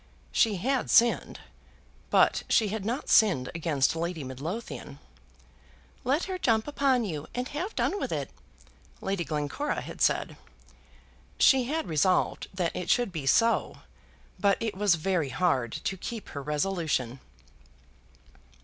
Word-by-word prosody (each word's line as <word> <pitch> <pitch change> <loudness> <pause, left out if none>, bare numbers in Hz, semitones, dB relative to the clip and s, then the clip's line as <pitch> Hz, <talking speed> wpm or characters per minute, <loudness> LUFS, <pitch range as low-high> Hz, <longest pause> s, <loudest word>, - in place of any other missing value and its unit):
She 220 -3 +3
had 255 +8 -1
sinned, 235 0 +3 0.7
but - - +4
she 220 -4 +3
had 215 0 -3
not 240 +6 -2
sinned 180 - +4
against 160 -4 +1
Lady 165 -1 -3
Midlothian. 140 - -6 1.1
"Let 280 +7 +1
her 375 -1 -4
jump 225 -6 +2
upon 270 -4 +1
you, 155 -6 -5
and 250 +1 -2
have 350 +9 -4
done 405 - 0
with - - -3
it," - - -3 0.7
Lady 195 -2 -2
Glencora 155 - -2
had - - -9
said. - - +1 1.0
She 265 -3 +5
had 315 +5 -2
resolved 175 +4 +1
that 180 -3 -2
it 180 -1 -4
should 245 -5 +2
be 155 -6 -5
so, 230 - +2 0.6
but 200 +1 +3
it 225 -3 -3
was 200 -2 +3
very 165 -3 -1
hard 130 -4 +1
to 190 - -3
keep 225 +3 -6
her 140 - -6
resolution. 150 -4 -1
195 Hz, 135 wpm, -28 LUFS, 155-240 Hz, 1.1 s, She